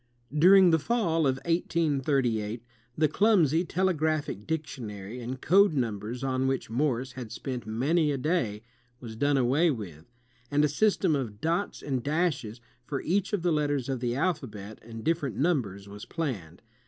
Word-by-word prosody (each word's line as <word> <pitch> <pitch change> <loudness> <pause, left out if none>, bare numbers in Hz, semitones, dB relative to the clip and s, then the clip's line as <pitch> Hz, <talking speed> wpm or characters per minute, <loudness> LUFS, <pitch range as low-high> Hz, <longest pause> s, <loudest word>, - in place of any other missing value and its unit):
During 185 +3 +7
the 160 - +4
fall 165 -5 +1
of 130 - +2
1838, 135 -10 0 0.3
the 155 0 +4
clmnsy 170 -4 +3
telegraphic 155 - 0
dic 160 -1 -1
tionary 110 -4 -8
and 125 +2 -5
code 195 +5 +4
nimibers 120 0 -2
on 130 0 0
which 130 -4 -2
Morse 130 0 0
had 125 -4 -8
spent 125 -4 -5
many 145 +8 +1
a 140 - -1
day 130 - -1 0.4
was 115 -3 -8
done 145 +4 +2
away 135 +7 +3
with, 95 - -6 0.4
and 145 +1 +3
a - - +3
system 185 +1 +2
of 115 -7 -4
dots 170 - -1
and 130 -3 -1
dashes 140 -6 -1 0.2
for 135 +2 -3
each 195 +3 0
of 205 -5 -1
the 175 -2 +2
letters 145 -4 0
of 130 -2 -1
the 120 0 -1
alphabet 125 - -3
and 115 0 -9
different 155 -6 -1
niunbers 120 - 0
was 105 +1 -9
planned. 105 - -5
140 Hz, 160 wpm, -28 LUFS, 115-165 Hz, 0.4 s, During